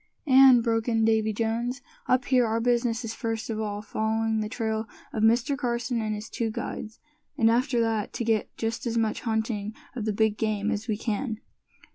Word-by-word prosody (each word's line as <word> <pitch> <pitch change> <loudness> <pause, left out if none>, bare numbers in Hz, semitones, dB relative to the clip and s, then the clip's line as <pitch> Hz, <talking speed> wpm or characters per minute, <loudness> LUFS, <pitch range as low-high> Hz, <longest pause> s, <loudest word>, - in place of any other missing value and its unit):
"And," 260 -3 +7
broke 225 -1 0
in 225 -1 +2
Davy 220 -1 +2
Jones, 235 +4 -2 0.2
"up 255 0 +2
here 250 -3 +3
our 225 +1 0
business 235 0 +1
is 225 - -4
first 225 0 -3
of 215 - -3
all 205 -1 -3
following 220 +1 0
the 215 0 -2
trail 220 -1 -2 0.3
of 220 - -2
Mr. 235 +5 +3
Carson 240 -3 -1
and 215 -1 -2
his 210 +1 -7
two 230 +1 -2
guides; 220 0 -6 0.4
and 225 -4 +4
after 245 +1 +2
that, 225 -2 0
to - - -2
get 220 -2 +1
just 225 +2 -2
as 230 0 -1
much 220 -2 0
hunting 220 -2 -2 0.2
of 230 -4 -3
the 215 - +1
big 215 0 +1
game 215 -1 0
as 220 0 -3
we 215 -3 0
can." 220 +1 -2
225 Hz, 195 wpm, -27 LUFS, 220-235 Hz, 0.4 s, And